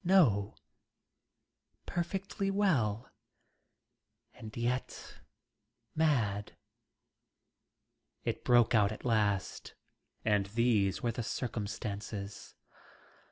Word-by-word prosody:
No, 120 Hz, -, +4 dB, 1.3 s
perfectly 195 Hz, +3 st, -2 dB
well, 135 Hz, -, +1 dB, 1.2 s
and 110 Hz, +1 st, -10 dB
yet 120 Hz, +2 st, -3 dB, 0.7 s
mad. 115 Hz, -11 st, +1 dB, 1.7 s
It -, -, -2 dB
broke 120 Hz, -2 st, +5 dB
out 105 Hz, -2 st, +4 dB
at 110 Hz, -, -8 dB
last, 105 Hz, -5 st, 0 dB, 0.5 s
and 105 Hz, -2 st, +2 dB
these 110 Hz, -3 st, +2 dB
were 120 Hz, -, +1 dB
the 120 Hz, -, -4 dB
circumstances. 105 Hz, -3 st, -4 dB
110 Hz, 70 wpm, -32 LUFS, 105-130 Hz, 1.7 s, broke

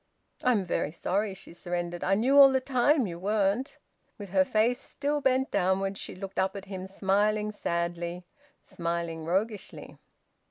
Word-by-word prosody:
"I'm 235 Hz, -7 st, +2 dB
very 160 Hz, -3 st, -1 dB
sorry," 195 Hz, +4 st, -1 dB
she 190 Hz, -, -10 dB
surrendered. 175 Hz, 0 st, -4 dB
"I 195 Hz, -, +3 dB
knew 250 Hz, +7 st, +2 dB
all 275 Hz, -1 st, +10 dB
the 265 Hz, -, +2 dB
time 260 Hz, +1 st, +2 dB
you 170 Hz, -3 st, -6 dB
weren't." 205 Hz, +6 st, 0 dB, 0.4 s
With 205 Hz, -3 st, -8 dB
her 190 Hz, 0 st, +4 dB
face 230 Hz, +6 st, +1 dB
still 290 Hz, +1 st, -2 dB
bent 265 Hz, 0 st, +1 dB
downwards, 195 Hz, +1 st, 0 dB
she -, -, -7 dB
looked 195 Hz, +1 st, -6 dB
up 190 Hz, +1 st, 0 dB
at 200 Hz, -1 st, -7 dB
him, 190 Hz, -1 st, -6 dB
smiling 210 Hz, +2 st, +1 dB
sadly, 170 Hz, -2 st, -3 dB, 0.4 s
smiling 170 Hz, -1 st, -3 dB
roguishly. 200 Hz, +4 st, -3 dB
195 Hz, 155 wpm, -28 LUFS, 175-225 Hz, 0.4 s, all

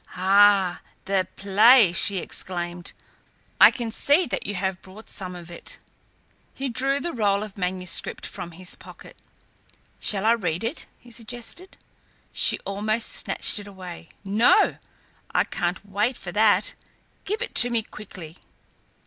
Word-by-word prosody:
"Ah! 195 Hz, 0 st, +4 dB, 0.2 s
The 190 Hz, -1 st, 0 dB
play!" 210 Hz, +1 st, +5 dB
she 195 Hz, +3 st, +5 dB
exclaimed. 175 Hz, -1 st, -5 dB, 0.7 s
"I -, -, +10 dB
can 235 Hz, -3 st, -5 dB
see 290 Hz, +9 st, +4 dB
that 195 Hz, -6 st, -4 dB
you 205 Hz, -, -4 dB
have 190 Hz, 0 st, -3 dB
brought 195 Hz, +4 st, -14 dB
some 180 Hz, -2 st, -4 dB
of 175 Hz, -1 st, -11 dB
it." 170 Hz, -, -6 dB, 0.8 s
He 270 Hz, 0 st, -3 dB
drew 270 Hz, +4 st, 0 dB
the 345 Hz, +3 st, -4 dB
roll 205 Hz, -3 st, +1 dB
of 210 Hz, -2 st, -9 dB
manuscript 180 Hz, -1 st, -2 dB
from 175 Hz, -3 st, -8 dB
his 180 Hz, +2 st, -6 dB
pocket. -, -, -13 dB, 0.8 s
"Shall 200 Hz, 0 st, +1 dB
I 225 Hz, -, +5 dB
read 180 Hz, -7 st, -1 dB
it?" 235 Hz, +8 st, -3 dB
he 245 Hz, -, -18 dB
suggested. 240 Hz, -, -7 dB, 0.6 s
She -, -, +3 dB
almost 215 Hz, +3 st, -2 dB
snatched -, -, 0 dB
it 205 Hz, -, -10 dB
away. 180 Hz, -4 st, -10 dB, 0.2 s
"No! 220 Hz, -, +3 dB, 0.6 s
I -, -, +4 dB
can't 180 Hz, +1 st, -3 dB
wait 210 Hz, +6 st, -1 dB
for 175 Hz, -, -8 dB
that. 210 Hz, 0 st, +3 dB, 0.5 s
Give 430 Hz, +5 st, -2 dB
it -, -, -6 dB
to 245 Hz, -, +4 dB
me, 235 Hz, -2 st, 0 dB
quickly." 185 Hz, -6 st, -11 dB
200 Hz, 145 wpm, -24 LUFS, 185-230 Hz, 0.8 s, I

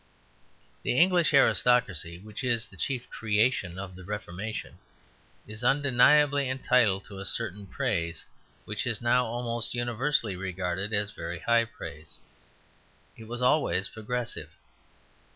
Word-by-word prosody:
The 125 Hz, -, -1 dB
English 175 Hz, -1 st, +4 dB
aristocracy, 95 Hz, -10 st, +3 dB
which 105 Hz, +6 st, -8 dB
is 120 Hz, -2 st, +1 dB
the -, -, -15 dB
chief 130 Hz, -3 st, -3 dB
creation 105 Hz, -4 st, +1 dB
of 95 Hz, -1 st, -7 dB
the 95 Hz, -, -11 dB
Reformation, 105 Hz, +2 st, -6 dB, 0.7 s
is 105 Hz, +3 st, -8 dB
undeniably 140 Hz, +1 st, +4 dB
entitled 120 Hz, -7 st, +2 dB
to 100 Hz, -1 st, -10 dB
a -, -, -5 dB
certain 105 Hz, -3 st, -3 dB
praise, 90 Hz, -, -2 dB, 0.4 s
which 110 Hz, +4 st, -3 dB
is 115 Hz, -3 st, +1 dB
now 120 Hz, +1 st, +2 dB
almost 120 Hz, 0 st, -3 dB
universally 120 Hz, -2 st, 0 dB
regarded 95 Hz, +1 st, -3 dB
as 105 Hz, -1 st, 0 dB
very 85 Hz, -1 st, -6 dB
high 115 Hz, +7 st, +2 dB
praise. 75 Hz, -9 st, -8 dB, 1.0 s
It 110 Hz, -, -12 dB
was 120 Hz, +2 st, -4 dB
always 125 Hz, -8 st, +2 dB
progressive. 120 Hz, +2 st, -4 dB
115 Hz, 125 wpm, -28 LUFS, 95-125 Hz, 1.0 s, English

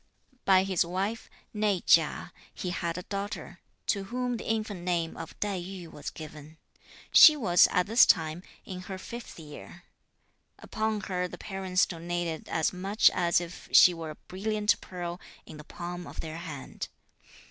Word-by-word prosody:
By 190 Hz, -1 st, +5 dB
his 190 Hz, -3 st, +1 dB
wife, 195 Hz, +6 st, -3 dB, 0.3 s
née 210 Hz, -4 st, +1 dB
Chia, 160 Hz, -2 st, +3 dB, 0.2 s
he 180 Hz, -, -4 dB
had 170 Hz, -1 st, -2 dB
a 180 Hz, -, -5 dB
daughter, 200 Hz, +2 st, -5 dB, 0.3 s
to 200 Hz, -2 st, 0 dB
whom 245 Hz, +3 st, -2 dB
the -, -, -6 dB
infant 215 Hz, -3 st, -1 dB
name 175 Hz, -2 st, -1 dB
of 165 Hz, -1 st, -9 dB
Tai 200 Hz, -3 st, -1 dB
Yü 180 Hz, -1 st, -8 dB
was 150 Hz, -, -6 dB
given. 155 Hz, 0 st, -11 dB, 0.6 s
She 310 Hz, -, +10 dB
was, 185 Hz, -, +5 dB
at 180 Hz, -2 st, +2 dB
this 225 Hz, +6 st, +6 dB
time, 160 Hz, 0 st, +2 dB, 0.2 s
in 185 Hz, -1 st, -6 dB
her 190 Hz, -, -4 dB
fifth 235 Hz, +1 st, -9 dB
year. 160 Hz, +3 st, -11 dB, 0.7 s
Upon 220 Hz, -1 st, -2 dB
her 180 Hz, -2 st, -2 dB
the 180 Hz, -, -9 dB
parents 190 Hz, -1 st, 0 dB
doated 170 Hz, -1 st, -4 dB
as 160 Hz, +2 st, +1 dB
much 195 Hz, +4 st, +3 dB
as 175 Hz, -2 st, +2 dB
if 175 Hz, 0 st, -9 dB
she 180 Hz, -, +8 dB
were 165 Hz, -2 st, -6 dB
a 155 Hz, -, -7 dB
brilliant 210 Hz, +2 st, 0 dB
pearl 175 Hz, 0 st, -6 dB, 0.2 s
in 155 Hz, -, -11 dB
the 150 Hz, -, -10 dB
palm 175 Hz, +1 st, -7 dB
of -, -, -10 dB
their 160 Hz, 0 st, -6 dB
hand. 155 Hz, -6 st, -7 dB
180 Hz, 165 wpm, -29 LUFS, 170-200 Hz, 0.7 s, She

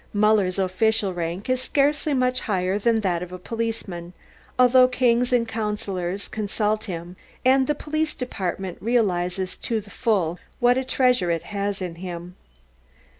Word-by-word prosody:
Muller's 205 Hz, -3 st, +3 dB
official 195 Hz, +2 st, +1 dB
rank 175 Hz, +2 st, -4 dB
is 255 Hz, 0 st, +1 dB
scarcely 290 Hz, +2 st, +1 dB
much 255 Hz, 0 st, +2 dB
higher 190 Hz, -1 st, 0 dB
than 225 Hz, +1 st, +2 dB
that 180 Hz, -4 st, 0 dB
of 180 Hz, 0 st, -6 dB
a 185 Hz, -, -6 dB
policeman, 195 Hz, -5 st, -4 dB, 0.4 s
although 255 Hz, 0 st, +6 dB
kings 250 Hz, -1 st, +2 dB
and 240 Hz, -2 st, +2 dB
councillors 200 Hz, -4 st, -3 dB
consult 215 Hz, 0 st, -1 dB
him 175 Hz, -2 st, -6 dB, 0.3 s
and 260 Hz, 0 st, +5 dB
the 295 Hz, -, +1 dB
Police 310 Hz, +1 st, -2 dB
Department 190 Hz, -7 st, -4 dB
realises 190 Hz, -5 st, 0 dB
to 225 Hz, -2 st, -1 dB
the 205 Hz, -1 st, -12 dB
full 190 Hz, -8 st, 0 dB, 0.2 s
what 245 Hz, +1 st, +5 dB
a 260 Hz, -, 0 dB
treasure 250 Hz, -8 st, +2 dB
it 165 Hz, -1 st, 0 dB
has 200 Hz, -1 st, -3 dB
in 175 Hz, -2 st, -4 dB
him. 175 Hz, -1 st, -6 dB
210 Hz, 150 wpm, -24 LUFS, 185-245 Hz, 0.4 s, although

